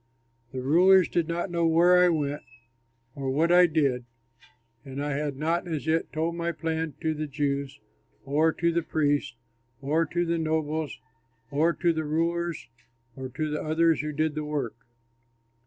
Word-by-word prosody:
The 130 -1 -5
rulers 180 +6 +5
did 170 -2 0
not 175 +2 -3
know 170 -1 +1
where 175 +2 +5
I 180 - +5
went 145 -3 -1 0.7
or 135 -1 -4
what 160 +6 +2
I 180 0 +7
did, 140 -6 0 0.8
and 135 0 -7
I 145 +1 -2
had 145 -1 -3
not 165 +4 -1
as 155 -4 -3
yet 160 +1 0
told 160 +2 -1
my 170 0 -1
plan 160 -2 -3
to 160 -1 0
the 155 0 -4
Jews 140 -1 -2 0.5
or 150 +4 +2
to 170 +1 0
the 170 0 +1
priests 145 -5 0 0.4
or 155 +4 0
to 175 0 -1
the 170 0 0
nobles 155 -1 -2 0.5
or 155 +4 +3
to 170 -1 +1
the 160 0 -2
rulers 165 +2 -1 0.5
or 130 -1 -6
to 155 +4 -3
the 150 - -2
others 160 +1 +2
who 150 0 -4
did 155 +1 0
the 155 0 -3
work. 145 -6 -3
155 Hz, 170 wpm, -27 LUFS, 145-170 Hz, 0.8 s, I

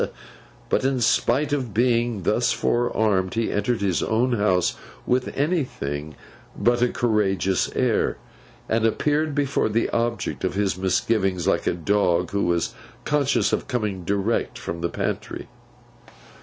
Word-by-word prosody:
But, - - +1
in 135 -1 +1
spite 130 +5 +2
of 130 -7 -2
being 120 -3 +1
thus 120 +6 +2
forearmed, 110 -6 +1
he 115 0 0
entered 105 +2 0
his 95 -4 +1
own 120 +4 +1
house 95 -5 +2 0.3
with 125 +1 +1
anything 100 - -2 0.4
but 120 0 +2
a 125 - +4
courageous 100 -6 +1
air; - - +1 0.5
and 115 0 +1
appeared 150 +6 +1
before 140 -5 +1
the 115 +2 0
object 115 -3 -1
of 95 -1 -1
his 100 -2 +1
misgivings, 95 0 0
like - - +1
a - - +2
dog 90 -1 +1
who 100 0 0
was 85 -1 0 0.3
conscious 145 -2 +1
of - - -1
coming 105 -7 -2
direct 100 +5 -1
from 85 0 -5
the 85 - 0
pantry. - - -4
110 Hz, 140 wpm, -24 LUFS, 95-120 Hz, 0.5 s, a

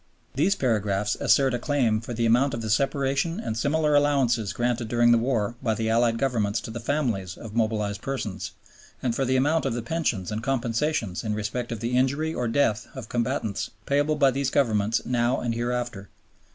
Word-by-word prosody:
These 170 +9 +2
paragraphs 105 -5 0
assert 135 -2 +3
a 120 - -1
claim 120 -7 +1
for 120 - -8
the 115 0 0
amount 125 +4 +3
of 115 - -5
the 110 - -2
Separation 140 - 0
and 110 - -3
similar 150 +5 +1
Allowances 135 -7 +2
granted 120 -1 -1
during 120 +1 +3
the 120 - +5
war 115 -3 0
by 110 -4 0
the 110 0 -1
Allied 115 0 +3
Governments 115 -5 0
to - - -7
the 120 - -5
families 115 - -1
of 110 -3 -9
mobilized 110 -3 -1
persons, 105 -9 -4 0.5
and 120 -3 0
for 135 - 0
the 130 +1 +1
amount 145 +3 +2
of 120 - -1
the 120 - -3
pensions 120 - -1
and 105 +1 -3
compensations 115 - -1
in 105 -1 -1
respect 110 +3 -3
of 115 - -4
the 120 +2 -1
injury 140 +5 +1
or 125 -5 -1
death 115 -3 +1
of 130 -5 -8
combatants 120 -4 -1 0.2
payable 145 +2 +2
by 140 -3 +4
these 135 +1 -1
Governments 110 -4 +1
now 120 +1 +1
and 120 -1 -2
hereafter. 120 -4 -3
120 Hz, 190 wpm, -25 LUFS, 110-135 Hz, 0.5 s, the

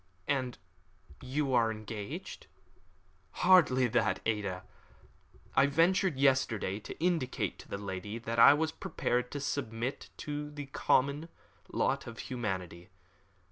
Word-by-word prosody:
"And 130 -3 -1 0.6
you 135 +1 -1
are 115 -2 +4
engaged?" 110 -1 -7 1.0
"Hardly 165 -9 +6
that, 115 0 +1
Ada. 100 -4 -1 0.9
I 140 - +5
ventured 170 +2 +2
yesterday 130 -8 +2
to - - -9
indicate 165 -6 -1
to - - -13
the - - -3
lady 100 +2 -5
that 115 0 -3
I 140 +5 +9
was 160 +1 0
prepared 125 -5 -2
to 145 - -5
submit 130 -3 -3
to 150 0 -4
the 145 -1 -7
common 140 +3 +1 0.4
lot - - 0
of - - -8
humanity. 95 -7 -4
130 Hz, 120 wpm, -31 LUFS, 110-145 Hz, 1.0 s, I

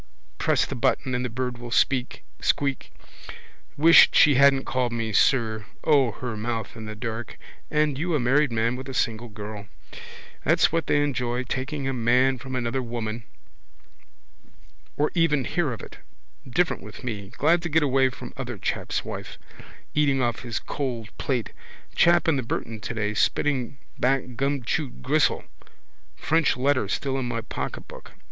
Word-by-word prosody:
Press - - +2
the - - -6
button 130 - 0
and 125 0 0
the 125 - -2
bird 125 +1 -3
will 120 0 -7
squeak. 130 +1 +1 1.5
Wish 165 +3 +8
she 150 - +6
hadn't 135 0 +5
called 125 -2 0
me 115 -2 -3
sir. 110 -3 +2 0.2
O, 140 -5 +4
her 125 -3 -5
mouth 115 +1 -4
in 110 -1 -8
the 105 0 -6
dark! 115 0 -5 0.3
And 150 -2 +1
you 170 +1 0
a - - +2
married 135 +3 +3
man 115 +2 +1
with 130 +1 -7
a 130 - -6
single 115 0 -1
girl! 105 -1 -8 0.8
That's - - +3
what 165 -1 -1
they 145 - +3
enjoy. 125 -3 -1
Taking 135 +2 -3
a 135 - -1
man 125 +2 +2
from 130 0 -6
another 125 +1 -1
woman. 115 -2 -4 1.7
Or 150 - +1
even 150 -6 +2
hear 170 -6 0
of 115 - -6
it. - - -11 0.5
Different 175 +7 +1
with - - -11
me. 105 -5 -4
Glad 165 +4 +3
to 170 - -3
get 160 +1 +3
away 135 -1 +3
from 125 -1 -10
other 125 -4 -5
chap's - - -2
wife. - - -7 0.6
Eating 145 -2 +2
off 120 -3 0
his 115 -3 -4
cold 120 -2 -4
plate. 125 -5 -1 0.4
Chap 170 0 +4
in 160 -4 +3
the - - 0
Burton 115 -1 -4
today 105 -1 -2
spitting 130 +3 0 0.2
back 135 +1 +2
gumchewed 135 - -2
gristle. - - +2 0.7
French 160 -3 +1
letter 130 -4 +1
still 135 +6 -1
in 125 - -2
my 115 -1 -2
pocketbook. - - -7
125 Hz, 160 wpm, -25 LUFS, 115-140 Hz, 1.7 s, Wish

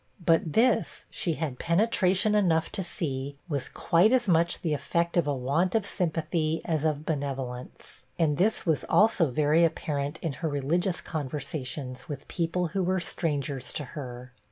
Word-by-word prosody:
But 165 -2 +3
this, 240 +1 +2
she 170 - -1
had 150 -5 -4
penetration 190 +2 +2
enough 175 -6 +2
to 210 - -2
see, 140 -6 -4
was 140 -5 -2
quite 175 +7 +3
as 255 -3 +3
much 170 -1 +2
the 160 -3 0
effect 170 +3 -1
of 170 -4 +2
a 145 - +1
want 145 - 0
of 220 -3 +2
sympathy 165 -3 -1
as 155 -3 0
of 155 -1 0
benevolence; 135 -4 -5
and 150 -3 +2
this 215 +4 +2
was 160 -4 +1
also 200 -7 +4
very 150 +5 +3
apparent 145 -3 -1
in 160 -4 -1
her 160 - 0
religious 165 +6 0
conversations 130 -3 -5
with 140 -2 -6
people 170 0 -1
who 190 +3 -1
were 185 +1 +1
strangers 145 -6 -2
to 150 - -3
her. 125 -4 -7
160 Hz, 160 wpm, -28 LUFS, 140-175 Hz, -, also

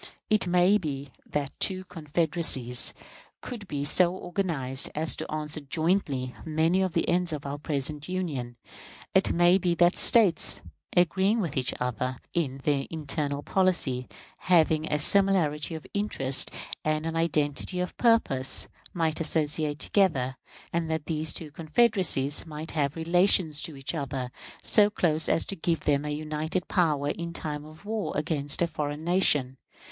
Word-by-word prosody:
It 215 -3 +2
might 180 +4 +3
be 140 -3 -5 0.2
that 145 -2 -3
two 185 -1 +1
confederacies 155 -7 +1 0.4
could 225 -5 -8
be 145 -3 -3
so 175 +5 +4
organized 165 -9 -1
as 155 +1 0
to - - -5
answer 155 0 -3
jointly 145 -4 -1
many 160 +3 +1
of 185 -3 -1
the 165 - 0
ends 175 0 +2
of 150 -2 -5
our 140 +1 -5
present 150 +1 -2
Union; 145 -10 -4 0.6
it - - +3
might 175 +2 +4
be 175 -1 +1
that 175 +1 +3
States, 170 - +4 0.3
agreeing 190 +5 +3
with 170 -9 -3
each 130 -1 0
other 125 +1 -2 0.2
in 135 -5 -2
their 140 -2 0
internal 145 -2 -3
policy 170 -10 0 0.3
having 160 -3 +2
a 150 - +2
similarity 165 -3 +3
of 160 - -9
interests 140 -10 +1 0.3
and 155 0 -1
an 165 0 -3
identity 160 +1 -1
of 180 0 -3
purpose 140 - +2 0.3
might 160 -2 0
associate 155 -2 +1
together, 145 -9 +1 0.4
and 165 -1 -1
that 160 -2 -2
these 155 -1 -2
two 155 -3 -6
confederacies 160 - +2
might 155 +1 -7
have 145 -3 -1
relations 170 -2 +3
to 155 -4 -4
each 135 +1 -4
other 135 -5 -4 0.3
so 205 -1 +5
close 160 -6 0
as - - +2
to 195 - -4
give 165 -1 -1
them 145 0 0
a - - -3
united 155 +4 -3
power 150 -6 +1
in 170 0 -6
time 150 -2 -4
of 155 +5 -14
war 215 0 -3
against 150 0 +2
any - - +1
foreign 150 -1 -4
nation. 150 -7 +1
155 Hz, 150 wpm, -27 LUFS, 145-175 Hz, 0.6 s, so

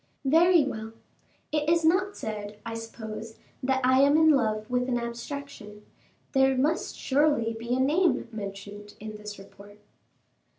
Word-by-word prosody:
"Very 330 +3 +5
well; 225 -4 -5 0.6
it 300 0 0
is 335 -1 +3
not 375 +5 +2
said, 210 -1 -5
I 230 - -4
suppose, 225 -1 -7 0.2
that 265 0 +1
I 260 +1 +5
am 285 +2 +5
in 315 0 +6
love 215 -6 +1
with 250 +1 -1
an 245 - +1
abstraction. 235 -3 -7 0.5
There 265 -1 +3
must 305 +6 0
surely 280 -5 +2
be 235 +2 -3
a - - -1
name 315 +6 +2
mentioned 205 0 -8
in 215 0 -7
this 210 0 -8
report." 200 +1 -14
245 Hz, 145 wpm, -27 LUFS, 215-285 Hz, 0.6 s, in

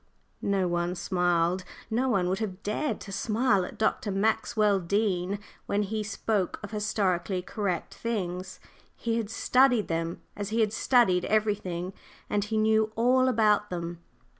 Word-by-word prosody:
No 195 -2 +1
one 175 +1 -1
smiled. 175 0 +1 0.3
No 250 +4 +1
one 195 -6 +2
would 185 +1 0
have 205 -3 -4
dared 250 +9 -1
to 195 - -8
smile 210 0 +2
at - - -7
Dr. 215 -1 0
Maxwell 210 0 +2
Dean 195 0 0 0.3
when 205 +1 +1
he 215 +2 -2
spoke 210 -2 -1
of 205 - -6
"historically 190 -4 0
correct" 195 -3 -3
things. 185 -5 -4 0.4
He 230 -1 -1
had 220 -3 -2
studied 250 -1 +3
them 165 0 -2
as 205 0 -4
he 225 +1 +1
had 215 -1 +1
studied 230 -7 +3
everything, 195 -4 0 0.4
and 205 -1 +2
he 215 +2 -2
knew 220 0 +3
all 255 +3 +4
about 215 -4 +3
them. 170 -1 -4
205 Hz, 150 wpm, -28 LUFS, 180-220 Hz, 0.4 s, all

